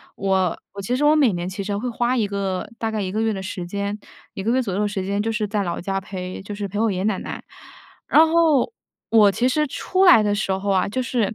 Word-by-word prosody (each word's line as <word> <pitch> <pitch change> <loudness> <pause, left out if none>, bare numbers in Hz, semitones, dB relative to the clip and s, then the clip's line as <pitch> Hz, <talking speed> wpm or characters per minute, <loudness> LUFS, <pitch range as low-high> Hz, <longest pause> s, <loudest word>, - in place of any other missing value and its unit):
我 190 -2 0 0.2
我 200 - -6
其 245 +6 -1
实 295 - +1
我 300 +1 +5
每 280 -8 +4
年 175 0 -3
其 195 +2 -5
实 200 0 -2
会 250 +5 -3
花 240 +2 0
一 215 -3 +1
个， 195 -2 -3
大 225 -1 -2
概 215 -1 -2
1 185 -1 -3
个 215 +2 -1
月 225 0 +1
的 195 - -4
时 185 -2 -5
间， 200 +3 -3 0.4
1 195 - -5
个 230 - +1
月 260 +1 +2
左 200 -6 -3
右 205 - 0
的 210 - +1
时 195 -2 -3
间 200 +1 -1
就 225 - -1
是 210 -1 -1
在 205 0 -1
老 175 -2 -3
家 195 +1 -2
陪 185 -1 -6
就 200 +2 -7
是 205 0 -4
陪 200 +2 -6
我 225 -1 +2
爷 185 - -3
爷 185 - -2
奶 205 -2 +1
奶。 - - -7 0.6
然 320 +1 +6
后 325 - +3 0.4
我 210 -3 +6
其 245 +6 +1
实 300 +4 +1
出 370 +7 0
来 345 - +8
的 205 -1 +1
时 200 -1 -1
候 190 +1 -2
啊， 190 0 +2
就 255 +6 -2
是 235 -4 -1
205 Hz, 285 characters per minute, -22 LUFS, 195-235 Hz, 0.6 s, 来